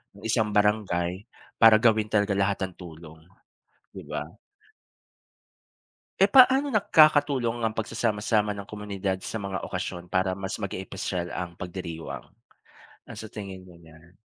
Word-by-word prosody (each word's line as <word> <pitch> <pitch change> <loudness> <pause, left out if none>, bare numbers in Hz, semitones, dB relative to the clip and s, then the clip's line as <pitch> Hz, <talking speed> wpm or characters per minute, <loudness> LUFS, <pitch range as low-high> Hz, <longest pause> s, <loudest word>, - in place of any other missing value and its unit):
ng 100 - -15
isang 110 -1 +1
barangay 100 -3 0 0.3
para 115 -1 +8
gawin 110 -2 +3
talaga 105 -1 +1
lahat 100 0 +1
ng 95 - -15
tulong, 80 -2 -11 0.8
'di - - -8
ba? - - -3 2.0
Eh, 195 - +6
paano 265 +4 +6
nakakatulong 145 - +3
ang 110 - +1
pagsasama-sama 110 -1 0
ng 100 -1 -7
komunidad 100 -2 -3
sa 110 - -4
mga 95 -1 -4
okasyon 90 0 -5
para 95 0 +1
mas 95 +2 -5
maging 95 -2 -4
espesyal 95 -2 -4
ang 85 -1 -5
pagdiriwang? 85 -8 -7 0.8
Ano - - -10
sa 110 - -8
tingin 100 -3 -8
mo 90 -2 -16
niyan? 80 +2 -19
100 Hz, 135 wpm, -26 LUFS, 90-110 Hz, 2.0 s, para